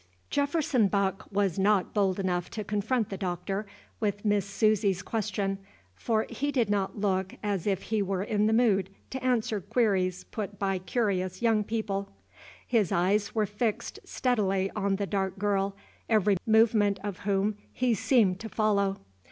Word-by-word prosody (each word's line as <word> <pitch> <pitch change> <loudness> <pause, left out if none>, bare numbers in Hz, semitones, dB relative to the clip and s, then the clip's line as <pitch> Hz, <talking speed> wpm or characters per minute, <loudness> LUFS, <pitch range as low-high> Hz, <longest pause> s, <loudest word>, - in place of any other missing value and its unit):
Jefferson 285 -5 +2
Buck 195 -1 -1
was 195 -2 +1
not 200 -1 +2
bold 195 -2 +1
enough 180 -2 -1
to 215 - -5
confront 210 +3 0
the 195 - -4
Doctor 195 +2 -3 0.3
with 205 -1 -2
Miss 205 -2 +2
Susy's 200 -2 +2
question, 200 -2 -2 0.3
for 220 - 0
he 280 +5 -2
did 240 -7 +1
not 200 -1 -1
look 190 -2 0
as 200 -3 -1
if 195 -2 0
he 220 -1 0
were 195 -1 -1
in 210 0 +1
the - - +2
mood 210 -5 +3 0.2
to 260 -1 -5
answer 230 -5 +1
queries 195 -4 +1
put 205 -2 -6
by 195 -1 0
curious 185 -2 -1
young 225 -2 +3
people. 205 -2 -2 0.6
His 220 -8 +1
eyes 200 +5 +1
were 215 -1 +2
fixed 210 +2 -2
steadily 195 -6 0
on 200 -2 +1
the 200 +1 -1
dark 195 -1 -2
girl, 200 -1 0 0.3
every 210 -3 +3
movement 220 -2 +4
of 205 -3 -4
whom 200 +1 0
he 250 -2 +1
seemed 205 -4 +3
to 225 - -6
follow. 200 -3 +1
205 Hz, 160 wpm, -28 LUFS, 195-220 Hz, 0.6 s, movement